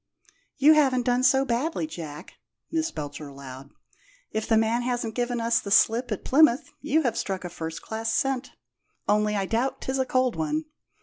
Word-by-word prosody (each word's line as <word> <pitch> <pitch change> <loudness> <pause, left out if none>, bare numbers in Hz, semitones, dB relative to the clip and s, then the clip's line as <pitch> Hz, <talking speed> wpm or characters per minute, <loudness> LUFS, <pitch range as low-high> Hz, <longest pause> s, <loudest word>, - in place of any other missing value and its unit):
"You 295 +2 +7
haven't 265 -5 +3
done 245 0 +2
so 265 +1 +4
badly, 275 +7 -1
Jack," 155 - -8 0.4
Miss 320 0 0
Belcher 145 -1 -7
allowed. 135 -1 -10 0.6
"If 220 - -2
the 225 - +4
man 225 +2 +2
hasn't 240 -2 -2
given 245 0 -1
us 230 0 +2
the 200 - -7
slip 230 +4 +3
at 210 - -4
Plymouth 280 -2 +4
you 310 +2 +1
have 240 -4 0
struck 195 -5 -3
a - - -4
first 160 -1 -6
class 225 0 -3
scent. 270 +1 -1 0.5
Only 210 0 +2
I 195 -1 0
doubt 235 +6 -1
'tis 265 0 -2
a 260 - +2
cold 255 -1 +1
one. 310 0 -1
235 Hz, 180 wpm, -26 LUFS, 210-265 Hz, 0.6 s, You